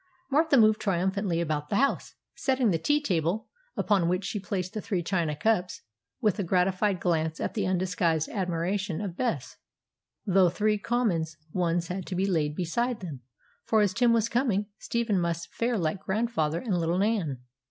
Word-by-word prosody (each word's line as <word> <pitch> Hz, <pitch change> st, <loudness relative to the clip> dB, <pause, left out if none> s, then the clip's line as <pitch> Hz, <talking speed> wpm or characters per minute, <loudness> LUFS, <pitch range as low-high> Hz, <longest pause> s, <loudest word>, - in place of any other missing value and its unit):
Martha 300 Hz, 0 st, +4 dB
moved 215 Hz, -1 st, +5 dB
triumphantly 190 Hz, -2 st, 0 dB
about 150 Hz, -3 st, -2 dB
the -, -, 0 dB
house, 275 Hz, +6 st, +1 dB, 0.2 s
setting 260 Hz, -5 st, +1 dB
the 165 Hz, -, +1 dB
tea 295 Hz, -, +2 dB
table, 185 Hz, -, 0 dB, 0.3 s
upon 190 Hz, -5 st, +2 dB
which 180 Hz, +2 st, 0 dB
she 210 Hz, -, -2 dB
placed 185 Hz, -1 st, -3 dB
the 215 Hz, -, -3 dB
three 195 Hz, -5 st, -2 dB
china 170 Hz, -4 st, 0 dB
cups, 185 Hz, +1 st, 0 dB, 0.4 s
with 210 Hz, -2 st, +1 dB
a -, -, +1 dB
gratified 185 Hz, +2 st, +1 dB
glance 160 Hz, -2 st, 0 dB
at -, -, -2 dB
the 205 Hz, -4 st, -1 dB
undisguised 180 Hz, -3 st, +1 dB
admiration 185 Hz, 0 st, -2 dB
of 200 Hz, -4 st, -4 dB
Bess; 180 Hz, -, -2 dB, 0.7 s
though 190 Hz, -2 st, +4 dB
three 210 Hz, +3 st, +1 dB
common 220 Hz, -8 st, +1 dB, 0.3 s
ones 170 Hz, -1 st, 0 dB
had 185 Hz, 0 st, -4 dB
to 185 Hz, -, -3 dB
be 190 Hz, +2 st, +1 dB
laid 155 Hz, -6 st, 0 dB
beside 230 Hz, +8 st, -1 dB
them, 155 Hz, -8 st, -7 dB, 0.4 s
for, 220 Hz, -1 st, +3 dB
as 200 Hz, -3 st, +2 dB
Tim 235 Hz, +3 st, +3 dB
was 230 Hz, -1 st, +3 dB
coming, 230 Hz, -5 st, +1 dB
Stephen 230 Hz, -5 st, 0 dB
must 170 Hz, -1 st, -2 dB
fare 235 Hz, 0 st, 0 dB
like 170 Hz, +1 st, -1 dB
grandfather 190 Hz, -7 st, 0 dB
and 200 Hz, -8 st, -1 dB
little 170 Hz, +1 st, 0 dB
Nan. 195 Hz, -, 0 dB
190 Hz, 175 wpm, -28 LUFS, 170-215 Hz, 0.7 s, moved